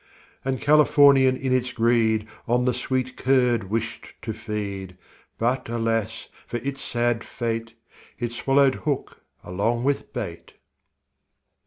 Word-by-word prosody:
And 130 -1 -1
Californian 140 -3 +5
in 130 -1 -1
its 125 -1 +1
greed, 115 -2 +2 0.2
On 125 +1 +2
the 125 - +2
sweet 130 +1 -2
curd 125 -5 +2
wished 115 +2 -4
to 110 - -3
feed; 100 -4 -5 0.4
But, 120 +1 0
alas, 115 -1 -1 0.2
for 120 - -3
it's 135 0 -4
sad 120 -1 0
fate, 115 -1 -4 0.4
It 120 -1 -3
swallowed 135 +2 +3
hook 145 -1 -3 0.2
along 110 +7 -1
with 140 +1 -1
bait. - - -6
120 Hz, 125 wpm, -24 LUFS, 115-130 Hz, 0.4 s, Californian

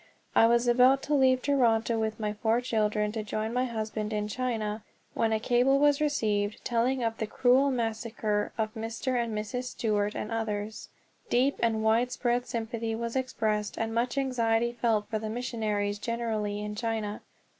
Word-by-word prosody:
I 225 - +7
was 235 +1 +3
about 255 +3 +5
to 300 - -1
leave 260 -2 +4
Toronto 230 -5 +2
with 220 0 -2
my 210 -1 -1
four 220 +2 +1
children 215 -3 0
to 220 0 -3
join 215 +2 -3
my 250 +1 +1
husband 215 -2 -3
in 210 -1 -1
China, 220 -2 -2 0.3
when 225 -1 +1
a 220 - +1
cable 245 +4 +3
was 290 +1 +3
received 215 -8 0
telling 245 +2 +1
of 225 -1 -2
the 220 - -1
cruel 260 +5 +3
massacre 225 -3 -1
of 215 -1 -1
Mr. 235 +2 -2
and 225 -2 -4
Mrs. 230 +4 -3
Stewart 210 -4 -1
and 215 - -4
others. 215 -1 -3 0.4
Deep 260 +3 +2
and 225 -2 +1
widespread 240 +2 +1
sympathy 230 -1 -3
was 235 +1 -4
expressed 220 -5 -1
and 225 0 -2
much 240 +3 0
anxiety 235 -3 +1
felt 230 -3 0
for 215 - -2
missionaries 215 -2 -2
generally 215 -3 -2
in 210 0 -4
China. 215 -1 -3
225 Hz, 165 wpm, -28 LUFS, 215-245 Hz, 0.4 s, I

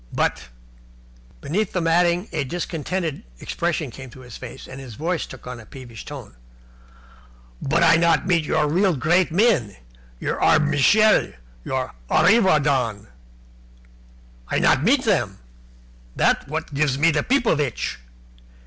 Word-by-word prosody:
But 65 - -1 0.5
" - - -27
Beneath 195 +7 -2
the 180 - 0
matting 175 +3 +2
a 150 - -1
discontented 165 +2 -4 0.2
expression 165 -5 -2
came 135 - -10
into 130 +1 -13
his 125 -3 -11
face, 125 - -10
and 130 +1 -9
his 125 -5 -10
voice 165 +4 -2
took 130 - -12
on 125 -1 -7
a 110 - -13
peevish 120 -5 -11
note. - - -9 1.3
"But 155 +5 +1
I 165 -1 +6
not 165 -1 +2
meet 175 -4 +2
your 150 0 +1
real 180 +3 +2
great 170 +6 +2
men 170 - +2 0.4
your - - -3
Arbmishel, 155 - +4 0.3
your 130 -1 -3 0.2
Arreevadon 150 - +2 1.4
I - - -1
not 130 - +3
meet 260 - +3
them. 120 - 0 0.8
That's - - +1
what 160 0 -5
gives 140 -2 +1
me 165 +3 +4
the 150 -1 +1
pipovitch. 160 - 0
150 Hz, 135 wpm, -22 LUFS, 130-175 Hz, 1.4 s, I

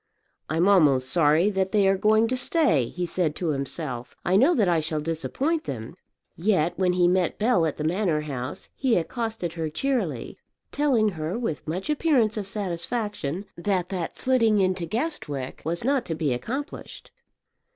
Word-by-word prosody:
"I'm 165 +5 +2
almost 140 -10 +4
sorry 165 +4 +4
that 190 -1 0
they 205 -3 +3
are 195 - +4
going 215 +3 +3
to 255 - 0
stay," 250 - +2
he 180 +6 -4
said 170 -3 -1
to 175 - -2
himself; 135 -3 -3
"I 180 - +2
know 275 - +5
that 210 -6 +3
I 170 -2 +3
shall 155 0 -2
disappoint 255 - -2
them." 115 0 -5 0.4
Yet 175 -3 +1
when 180 -1 +1
he 180 -1 +3
met 180 -1 +1
Bell 210 -7 +3
at 155 - -4
the 150 - -3
Manor 170 -1 +1
House 135 -3 -5
he 260 -4 +2
accosted 220 -1 -3
her 165 -2 -3
cheerily, 270 - -2 0.3
telling 260 -7 +2
her 160 +1 -4
with 225 -13 -4
much 180 +5 -3
appearance 285 -8 +2
of 205 -3 -4
satisfaction 200 - -3
that 180 0 -1
that 180 -4 -4
flitting 230 -5 +3
into 185 -2 0
Guestwick 160 - -3
was 170 +5 -2
not 270 0 +2
to 165 - -3
be 155 -4 0
accomplished. 260 - -6
185 Hz, 170 wpm, -25 LUFS, 160-225 Hz, 0.4 s, know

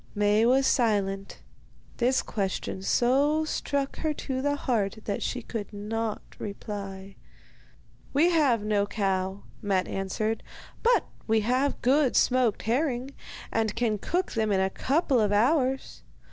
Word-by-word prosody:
Maie 210 +2 +3
was 265 +2 +4
silent. 200 -6 0 0.5
This 255 +2 +2
question 190 -2 -3
so 280 +9 +2
struck 280 -2 -2
her 310 -2 -1
to 260 -2 -3
the 285 +1 +1
heart 220 -8 -1
that 200 - -2
she 250 -2 -3
could 220 -3 -5
not 215 +1 -3 0.2
reply. 200 -2 -6 0.9
'We 320 +6 +4
have 275 -10 +3
no 205 -1 +1
cow,' 195 -1 -1 0.2
Matte 195 -3 0
answered; 215 +3 -2 0.4
'but 485 +1 +3 0.2
we 220 0 +3
have 255 +6 0
good 265 +1 +3
smoked 250 -4 +2
herring, 255 +2 0 0.4
and 220 -2 0
can 225 -3 0
cook 360 - -1
them 220 -2 0
in 195 - +2
a 190 0 +1
couple 275 - +1
of 210 -2 +2
hours. 260 +5 +1
225 Hz, 135 wpm, -27 LUFS, 205-265 Hz, 0.9 s, was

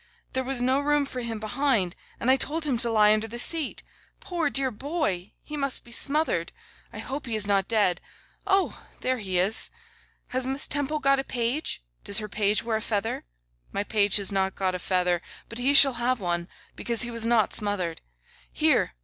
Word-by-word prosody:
There 260 - 0
was 255 -1 -2
no 260 +2 +2
room 295 0 +1
for 255 -2 -6
him 230 -2 -4
behind, 220 -5 0 0.2
and 255 - +2
I - - +6
told 310 +4 0
him 275 -4 +1
to 235 - +4
lie 210 -1 +5
under 215 +1 -1
the 235 +2 -8
seat. 310 +4 +2 0.4
Poor 340 -4 -2
dear 270 -2 +1
boy! 210 - -3
He 300 - -7
must 275 -2 0
be 240 - -15
smothered. 300 +6 +1 0.4
I - - -10
hope 275 0 -6
he 230 - -1
is 215 -2 +4
not 195 -2 +1
dead. 205 -6 +1 0.5
Oh! 390 -1 +1 0.2
there 255 -1 0
he 190 -4 -1
is. 190 +5 +4 0.6
Has 255 +1 -2
Miss 265 +2 0
Temple 290 +1 -1
got 275 -2 +2
a - - -1
page? 245 - -2 0.2
Does 200 - +1
her 215 -1 0
page 205 +1 +1
wear 225 -1 -1
a - - -6
feather? 215 - -2 0.5
My 200 - -1
page 205 -1 +2
has 200 -1 +2
not 190 -1 -1
got 190 -1 -1
a 180 - -4
feather, 180 -1 0 0.3
but 230 - -7
he 270 +3 +2
shall 275 -1 +8
have 245 +1 -1
one, 175 -2 -2 0.3
because 235 -1 +1
he 240 - -4
was 230 -1 -4
not 230 -3 +2
smothered. 195 -6 -1 0.5
Here! - - +1
235 Hz, 200 wpm, -26 LUFS, 205-270 Hz, 0.6 s, shall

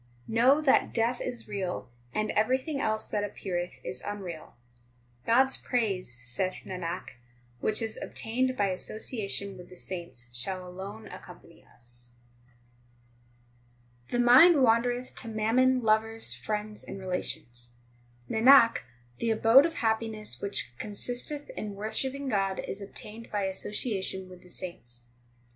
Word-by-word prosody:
3 - - -7
Know 260 +6 +5
that 285 -3 +3
death 235 +2 +2
is 245 -2 -4
real, 195 -4 -3 0.2
and 215 - -1
everything 260 +6 +1
else 220 0 +1
that 205 -1 -1
ap 205 - -5
peareth 175 -5 -3
is 125 0 -4
unreal. 190 -6 -6 0.7
God 240 +3 +6
s 265 0 -2
praise, 195 - -1
saith 185 +11 -2
Nanak, 180 -5 -5 0.4
which 215 - +1
is 220 -1 -3
obtained 255 +3 -1
by 200 -1 +2
association 200 0 -3
with 180 - -11
the 180 - -12
saints 170 -11 -6
shall 185 +8 -2
alone 195 +4 -8
accompany - - -13
us. 120 0 -2 2.0
4 - - -1
The 245 - +3
mind 275 +9 +9
wandereth 245 +2 +2
to 230 - -4
mammon, 240 +4 +2
lovers, 220 - +2
friends, 210 - -3
and - - -7
relations. 160 -10 -4 0.6
Nanak, 235 +1 +7 0.4
the 230 - 0
abode 225 +6 +6
of 330 - -7
happiness 220 - -1
which 200 -10 -1
consisteth 245 +7 -3
in 210 -2 -5
wor 215 +2 -4
shipping 275 +1 -2
God 195 -5 +1
is 195 - -4
obtained 215 +3 -8
by 205 -1 0
association 190 -1 -1
with 180 -1 -12
the 180 - -17
saints. 120 -11 -5
215 Hz, 140 wpm, -29 LUFS, 185-235 Hz, 2.0 s, mind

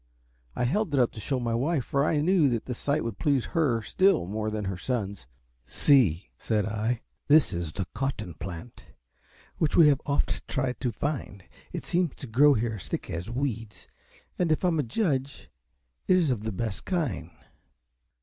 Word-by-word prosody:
I - - -1
held 155 - +1
it - - +3
up 125 - +3
to - - -10
show 130 +4 -1
my 120 -1 -1
wife, 135 +3 0
for 140 0 +1
I 150 0 +2
knew 170 -3 +4
the 125 +3 -5
sight 145 +5 -1
would 115 -4 -5
please 140 -4 +2
her 135 -10 +2
still 190 - +3
more 110 +3 -2
than 105 -1 -3
her 95 0 -2
sons. 100 - -3 0.4
"See," 105 - +3
said 105 -3 0
I, 110 +2 -1 0.2
"this 150 0 +5
is 85 -2 -3
the 95 +4 -3
COT 135 +4 -1
TON 100 -5 -6
plant, 90 +7 -8 0.8
which 155 - +1
you - - +7
have 150 -4 +5
oft 140 0 -1
tried 130 -2 -2
to 125 - -1
find. 115 -6 -4 0.3
It - - -5
seems 175 -4 0
to - - -8
grow 140 +5 +5
here 110 -1 -1
as - - -9
thick - - -4
as 85 +6 -4
weeds, 120 -4 -4 0.5
and, 175 -3 +2
if 155 - +1
I - - +4
am 165 -2 0
a - - +2
judge, 135 - -2 0.6
it 185 - +5
is 165 -6 +2
of 110 -4 -2
the 110 - -1
best 105 +1 -3
kind." 145 - -2
125 Hz, 190 wpm, -27 LUFS, 110-145 Hz, 0.8 s, you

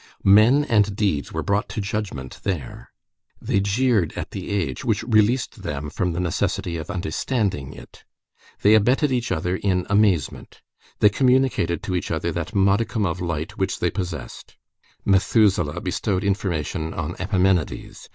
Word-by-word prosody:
Men 110 +9 +6
and 105 -3 +2
deeds 95 -9 -1
were - - -3
brought 100 +1 0
to - - -4
judgment 100 -10 -4
there. 85 -11 -4 0.5
They - - 0
jeered 100 -2 +1
at - - -6
the - - -6
age, 85 -11 -2
which - - 0
released 115 +2 +1
them 75 0 -4
from 90 +2 -1
the 85 - -3
necessity 85 0 -1
of 80 -1 -7
understanding 95 - -2
it. - - -14 0.6
They 105 - +6
abetted 125 +7 +3
each 120 -3 -1
other 90 +1 -1
in 90 -3 0
amazement. 100 -9 0 0.4
They 105 - +7
communicated 125 -7 +1
to 95 - -3
each 90 - -2
other 85 +1 -1
that 85 +2 -5
modicum 100 +3 +2
of 90 0 -2
light 85 +4 -4
which 95 0 0
they 85 - 0
possessed. 90 -3 -6 0.5
Methuselah 95 -5 +2
bestowed 95 -1 -1
information 85 -5 -2
on 85 +1 -4
Epimenides. 95 -3 -1
95 Hz, 150 wpm, -23 LUFS, 85-105 Hz, 0.6 s, They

